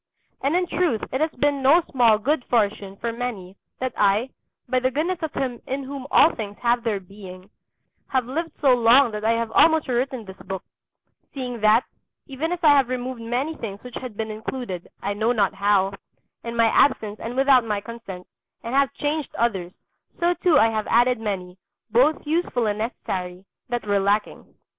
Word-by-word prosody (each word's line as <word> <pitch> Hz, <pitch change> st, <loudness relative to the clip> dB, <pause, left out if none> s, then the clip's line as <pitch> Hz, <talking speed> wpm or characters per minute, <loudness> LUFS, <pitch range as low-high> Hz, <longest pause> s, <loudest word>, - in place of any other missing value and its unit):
And 280 Hz, +5 st, +1 dB
in 360 Hz, 0 st, +2 dB
truth 345 Hz, -10 st, 0 dB
it 260 Hz, -, -1 dB
has 315 Hz, -, +2 dB
been 285 Hz, +1 st, 0 dB
no 305 Hz, +6 st, +5 dB
small 235 Hz, -4 st, +4 dB
good 265 Hz, +5 st, 0 dB
fortune 205 Hz, -4 st, 0 dB
for 235 Hz, +2 st, -3 dB
many 220 Hz, -6 st, -5 dB, 0.2 s
that 255 Hz, -1 st, -3 dB
I, 210 Hz, +5 st, +2 dB, 0.4 s
by 255 Hz, +1 st, +1 dB
the 255 Hz, +1 st, +1 dB
goodness 320 Hz, +7 st, -1 dB
of 320 Hz, -2 st, -3 dB
Him 250 Hz, -3 st, -3 dB
in 270 Hz, +1 st, -3 dB
whom 270 Hz, 0 st, -7 dB
all 325 Hz, -, +5 dB
things 205 Hz, -3 st, -6 dB
have 240 Hz, 0 st, +2 dB
their 220 Hz, -4 st, -1 dB
being, 190 Hz, 0 st, -12 dB, 0.6 s
have 260 Hz, -2 st, 0 dB
lived 315 Hz, +5 st, -4 dB
so 270 Hz, -4 st, +5 dB
long 240 Hz, +1 st, +5 dB
that 210 Hz, 0 st, -5 dB
I 225 Hz, +1 st, +3 dB
have 230 Hz, -1 st, -2 dB
almost 320 Hz, +4 st, +4 dB
rewritten 250 Hz, -1 st, -1 dB
this 190 Hz, 0 st, -11 dB
book; 190 Hz, 0 st, -6 dB, 0.7 s
seeing 250 Hz, -3 st, -4 dB
that, 215 Hz, +3 st, +5 dB, 0.4 s
even 295 Hz, +4 st, -4 dB
as 355 Hz, -, -1 dB
I 310 Hz, -, +7 dB
have 265 Hz, -3 st, +2 dB
removed 255 Hz, -1 st, -4 dB
many 245 Hz, +7 st, -2 dB
things 200 Hz, -3 st, -7 dB
which 250 Hz, -1 st, -10 dB
had 245 Hz, -5 st, -8 dB
been 220 Hz, -1 st, -3 dB
included 215 Hz, -4 st, -5 dB, 0.2 s
I 200 Hz, -, -1 dB
know 220 Hz, +4 st, +1 dB
not 205 Hz, -4 st, +1 dB
how, 200 Hz, 0 st, +2 dB, 0.5 s
in 235 Hz, 0 st, -5 dB
my 230 Hz, -1 st, +4 dB
absence 220 Hz, -3 st, +2 dB
and 235 Hz, +2 st, -5 dB
without 265 Hz, -2 st, +5 dB
my 210 Hz, -2 st, -2 dB
consent, 200 Hz, -4 st, -9 dB, 0.4 s
and 235 Hz, +1 st, -5 dB
have 275 Hz, 0 st, +3 dB
changed 295 Hz, 0 st, -2 dB
others, 195 Hz, -7 st, -1 dB, 0.5 s
so 345 Hz, +1 st, +3 dB
too 345 Hz, -3 st, +3 dB
I 225 Hz, -4 st, +5 dB
have 215 Hz, -1 st, -2 dB
added 245 Hz, +1 st, +3 dB
many, 190 Hz, -4 st, -4 dB, 0.3 s
both 265 Hz, +9 st, +3 dB
useful 300 Hz, -6 st, 0 dB
and 210 Hz, 0 st, -1 dB
necessary, 185 Hz, -5 st, -4 dB, 0.2 s
that 240 Hz, -2 st, -2 dB
were 205 Hz, -1 st, +2 dB
lacking. 205 Hz, +2 st, -1 dB
235 Hz, 190 wpm, -23 LUFS, 210-265 Hz, 0.7 s, I